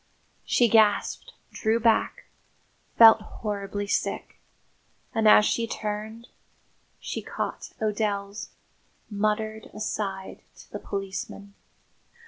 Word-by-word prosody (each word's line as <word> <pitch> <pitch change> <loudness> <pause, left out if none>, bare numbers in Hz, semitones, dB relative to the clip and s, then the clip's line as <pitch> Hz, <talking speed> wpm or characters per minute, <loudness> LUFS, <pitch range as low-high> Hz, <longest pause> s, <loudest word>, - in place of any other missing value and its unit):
She 240 - +3
gasped, 215 -2 +2 0.2
drew 220 +1 0
back, 230 -1 +2 0.7
felt 225 -1 +9
horribly 205 -1 -4
sick; 200 - -2 0.7
and, 220 -1 +2
as 210 0 +8
she 230 +1 0
turned, 220 +2 -5 0.7
she - - -5
caught - - -5
O'Dell's 205 -1 -2 0.6
muttered 215 +1 -1
aside 195 -3 -4 0.2
to - - -16
the - - -5
policeman. 195 0 -6
210 Hz, 95 wpm, -26 LUFS, 200-220 Hz, 0.7 s, felt